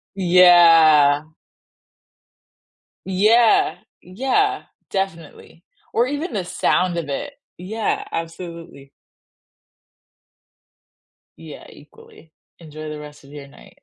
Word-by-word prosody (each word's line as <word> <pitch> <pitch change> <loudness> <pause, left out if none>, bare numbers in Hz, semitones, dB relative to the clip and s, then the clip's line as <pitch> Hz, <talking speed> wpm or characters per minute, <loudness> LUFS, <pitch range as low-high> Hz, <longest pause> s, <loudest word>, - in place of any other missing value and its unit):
Yeah. 165 -5 +5 1.8
Yeah. 215 +5 +2 0.3
Yeah. 270 - -1 0.3
Definitely. 195 - -6 0.3
Or 240 +2 +1
even 290 +1 -5
the 190 -4 -3
sound 180 0 -1
of 160 -4 -5
it. 280 - -5 0.2
Yeah, 210 +5 -4
absolutely. 165 -4 -8 2.5
Yeah, 160 -2 -12
equally. 155 +2 -19 0.3
Enjoy 155 -1 -10
the 150 0 -7
rest 150 -1 -13
of 140 - -18
your 145 -1 -11
night. 140 - -19
170 Hz, 85 wpm, -20 LUFS, 155-200 Hz, 2.5 s, Yeah